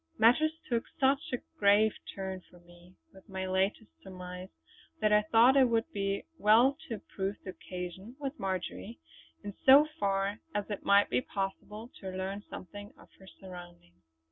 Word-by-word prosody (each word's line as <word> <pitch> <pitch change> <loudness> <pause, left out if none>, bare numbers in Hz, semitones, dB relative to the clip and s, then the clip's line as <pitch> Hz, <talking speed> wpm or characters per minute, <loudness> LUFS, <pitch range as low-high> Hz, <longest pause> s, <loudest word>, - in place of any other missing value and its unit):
Matters 260 +8 +4
took 235 -2 0
such 270 0 +2
a 250 - -3 0.2
grave 205 +1 +5 0.2
turn 190 -1 -5
for 175 - -18
me 175 +1 -19 0.2
with 190 - -18
my 190 -1 -4
latest 190 +4 -1
surmise, 180 -1 -9 0.5
that 215 -1 +3
I 210 - +6
thought 230 +5 +5
it 265 -3 +5
would 230 -1 0
be 195 -1 -1 0.2
well 235 +6 +5
to 230 - -3
improve 195 -1 -4
the 185 - -6
occasion 185 +5 -8
with 285 +1 -5
Marjory, 195 +4 -4 0.5
in 205 0 -6
so 275 +3 +8
far 195 +1 0 0.2
as 205 -1 -1
it 205 - -4
might 200 0 +4
be - - +2
possible 210 +2 -5
to 190 - -6
learn 190 +2 -4
something 205 +3 -9
of - - -18
her 190 - -15
surroundings. 175 - -13
200 Hz, 165 wpm, -31 LUFS, 190-225 Hz, 0.5 s, so